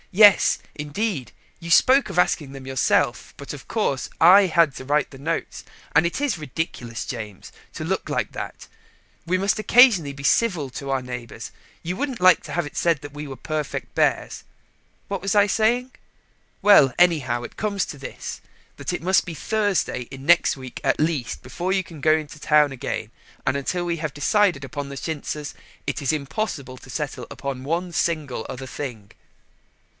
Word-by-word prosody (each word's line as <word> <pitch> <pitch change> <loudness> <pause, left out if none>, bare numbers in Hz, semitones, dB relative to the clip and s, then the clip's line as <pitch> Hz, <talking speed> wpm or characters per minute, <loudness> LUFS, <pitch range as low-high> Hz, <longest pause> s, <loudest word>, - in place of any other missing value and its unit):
Yes, 205 +1 +6 0.2
indeed, 150 - -3 0.3
you 170 - -7
spoke 260 +7 +5
of 180 -2 -1
asking 150 -5 +1
them 135 -1 -10
yourself, 130 -1 +1
but, 140 - -7
of 145 - -10
course, 140 - -1
I 190 +4 +8
had 165 -5 +3
to - - -7
write 145 +3 +1
the 135 - -12
notes, 165 +4 -3 0.3
and 155 +3 +5
it 170 - -1
is 280 - 0
ridiculous, 130 -5 -4
James, 105 -6 -7 0.2
to - - -4
look - - -2
like - - -1
that. - - -7 0.6
We 185 +2 +2
must 200 +3 +1
occasionally 215 - +5
be 140 0 -10
civil 170 - +2
to 140 +2 -6
our 135 -1 0
neighbours: 125 -2 -7 0.3
you 175 +2 -3
wouldn't 270 +1 -3
like 185 -2 +6
to - - -9
have 175 -2 0
it 145 - -9
said 170 -3 +2
we 150 0 -6
were 135 -1 -8
perfect 155 -2 -4
bears. - - 0 0.6
What 200 -2 -3
was 195 +1 -1
I 205 -1 +6
saying? 240 +5 +1 0.7
Well, 150 -11 +7
anyhow 145 -9 +3
it - - -9
comes 200 -2 -1
to 145 - -8
this, 135 - -7 0.3
that - - -4
it 175 - -4
must 190 +2 +4
be 170 - -7
Thursday 195 - -1
in 135 0 -9
next 170 -2 +4
week 130 -1 -9
at - - +1
least, 155 -6 -1
before 175 +9 -3
you 190 0 +1
can 165 -4 -12
go 155 +1 +4
to 155 +1 -12
town 150 -2 +3
again, 130 - -4 0.3
and 135 - +1
until 175 +6 -2
we 170 -1 -1
have 155 -3 -4
decided 170 -1 +2
upon 140 +2 -5
the 140 - -7
chintzes 150 -1 -4 0.3
it - - -2
is 135 - +1
impossible 140 - -3
to 130 - -15
settle 135 -4 -4
upon 135 -2 -5
one 170 +5 -2
single 150 -10 -1
other 130 +1 -6
thing." 120 -8 -7
155 Hz, 180 wpm, -23 LUFS, 135-185 Hz, 0.7 s, I